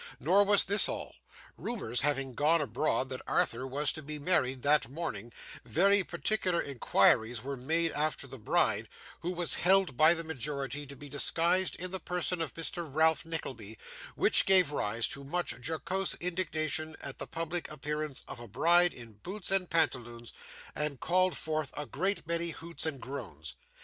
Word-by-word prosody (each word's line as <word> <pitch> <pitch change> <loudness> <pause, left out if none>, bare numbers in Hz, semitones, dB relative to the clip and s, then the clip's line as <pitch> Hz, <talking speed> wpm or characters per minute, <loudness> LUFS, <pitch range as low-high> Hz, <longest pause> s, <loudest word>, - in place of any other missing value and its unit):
Nor 190 +8 +4
was 205 -1 +5
this 205 +2 +3
all. - - -5 0.4
Rumours 160 - -2
having 135 -2 0
gone 155 +5 +3
abroad 130 0 0
that 130 -1 -5
Arthur 125 +3 +1
was 145 +2 +1
to 155 - -6
be 150 +1 -6
married 135 -5 +1
that 145 -4 +3
morning, 125 -7 -5 0.3
very 200 +3 +4
particular 180 0 0
inquiries 120 -3 +2
were 140 +1 -4
made 160 +6 0
after 150 -1 0
the 135 -1 -9
bride, 105 - +1 0.3
who 175 - -4
was 175 -2 +2
held 190 -5 +4
by 155 +6 +6
the 165 - -2
majority 145 -1 -4
to 140 - -10
be 145 +2 -11
disguised 170 +6 +1
in 185 0 -6
the 190 - -2
person 180 0 -2
of 160 - -4
Mr. 165 -1 -5
Ralph 160 +1 +3
Nickleby, 115 -10 -5 0.4
which - - +4
gave 185 -5 +5
rise 115 -4 0
to 140 - -5
much 175 +6 -1
jocose 185 +5 -2
indignation 160 -3 -2
at 140 - -6
the - - -5
public 165 +1 -4
appearance 150 -1 -4
of - - -8
a 120 - -9
bride 170 - +4
in 115 -4 -13
boots 195 +1 -6
and 190 -2 +2
pantaloons, 120 -8 -1 0.4
and 150 -3 -2
called 185 +3 +2
forth 155 -3 -2
a 150 - -3
great 175 +3 -2
many 170 +1 -1
hoots 165 +1 -4
and 140 -4 -4
groans. 110 - -8
155 Hz, 170 wpm, -31 LUFS, 135-175 Hz, 0.4 s, by